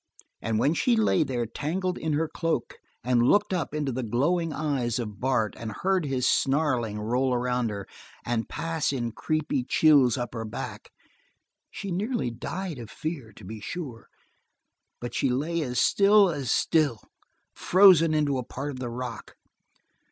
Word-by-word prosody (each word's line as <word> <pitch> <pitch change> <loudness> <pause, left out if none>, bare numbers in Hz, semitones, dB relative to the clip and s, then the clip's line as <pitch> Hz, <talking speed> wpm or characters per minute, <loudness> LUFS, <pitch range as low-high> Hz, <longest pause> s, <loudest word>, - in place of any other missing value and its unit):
And 115 -1 -1
when 140 +7 +3
she 235 +8 +2
lay 215 -5 +3
there 125 -5 -1
tangled 175 - -2
in 160 -1 -1
her 160 +2 +1
cloak 165 +1 -3 0.2
and 125 0 +2
looked 205 -1 +3
up 175 -6 -1
into 150 -2 -2
the 130 +1 -3
glowing 150 +9 0
eyes 135 -7 -1
of 105 -5 -5
Bart 125 -4 +1
and 115 -1 -6
heard 185 - 0
his 130 -3 0
snarling 130 -7 +1
roll 125 +4 0
around 125 -1 0
her, 100 -2 -5 0.4
and 115 -1 -1
pass 165 -3 -1
in 120 -4 -2
creepy 150 +1 -1
chills 135 -3 +4
up 120 -2 -4
her 115 -2 -4
back, 110 - -7 0.8
she 195 - -6
nearly 205 - -1
died 165 +6 -5
of 115 -2 -8
fear, 150 -8 -5
to 100 - -14
be 110 +3 -7
sure, 125 - -7 0.9
but 120 - -6
she 135 - +1
lay 155 +7 -1
as 125 -5 -1
still 200 - +5
as 140 -6 -3
still, 150 - +2 0.5
frozen 180 -4 +5
into 145 -3 +1
a - - -3
part 140 +4 -5
of 130 - -8
the 125 -2 -4
rock. 120 0 -6
135 Hz, 165 wpm, -27 LUFS, 120-165 Hz, 0.9 s, still